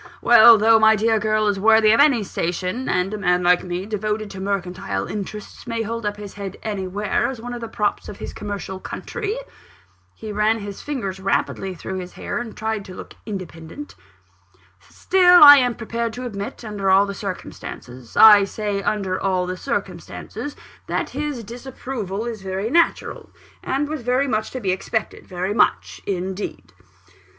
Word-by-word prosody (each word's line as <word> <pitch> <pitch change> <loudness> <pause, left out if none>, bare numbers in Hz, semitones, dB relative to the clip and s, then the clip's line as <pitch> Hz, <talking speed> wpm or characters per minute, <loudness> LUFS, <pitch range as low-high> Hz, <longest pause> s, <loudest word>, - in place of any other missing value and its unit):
Well, 235 -1 +8
though 225 +1 +5
my 220 0 +6
dear 220 +1 +2
girl 215 0 +1
is 200 -1 0
worthy 220 +1 +5
of 225 - +4
any 280 -6 +5
station; 185 +6 -3
and 180 +3 0
a 215 - -4
man 180 -2 +2
like 175 0 +4
me, 180 +1 -4
devoted 215 0 -3
to 195 - -8
mercantile 195 -1 -3
interests, 210 +3 -7
may 230 -1 -2
hold 230 0 -4
his 205 -1 -9
head 200 -2 -6
up - - -20
anywhere 200 -1 -1
as 260 -3 -5
one 245 +2 -6
of 240 - -6
the 230 - -5
props 210 -2 -2
of 205 - -8
this - - -7
commercial 200 -2 -6
country," 435 - -5 0.8
(he 215 -1 -7
ran 210 +2 +2
his 200 -2 -7
fingers 215 -10 -4
rapidly 190 0 -1
through 190 +2 -5
his 180 0 -8
hair, - - -4
and 240 -2 -7
tried 220 -1 -2
to 185 - -10
look - - -10
independent), 185 - -7 1.0
"still 360 -3 +5
I 290 -1 +12
am 245 -3 +2
prepared 230 0 -3
to 250 +2 -6
admit, 205 0 -6
under 205 -3 -2
all 195 +1 +5
the 200 - -5
circumstances 130 - -8
I 210 -2 +9
say 205 0 -3
under 195 -3 -1
all 185 -2 0
the 180 0 -4
circumstances 280 +5 -5 0.3
that - - -2
his 285 -3 -4
disapproval 235 -3 -6
is 230 -4 -5
very 190 +4 -3
natural, 335 +2 +1 0.3
and 275 +2 -1
was 305 -2 -4
very 250 +4 +1
much 220 -3 -1
to 260 - -6
be 195 -6 -1
expected 215 +4 -3
very 185 +2 -3
much 225 - +1
indeed." 190 - -4
210 Hz, 175 wpm, -22 LUFS, 190-230 Hz, 1.0 s, I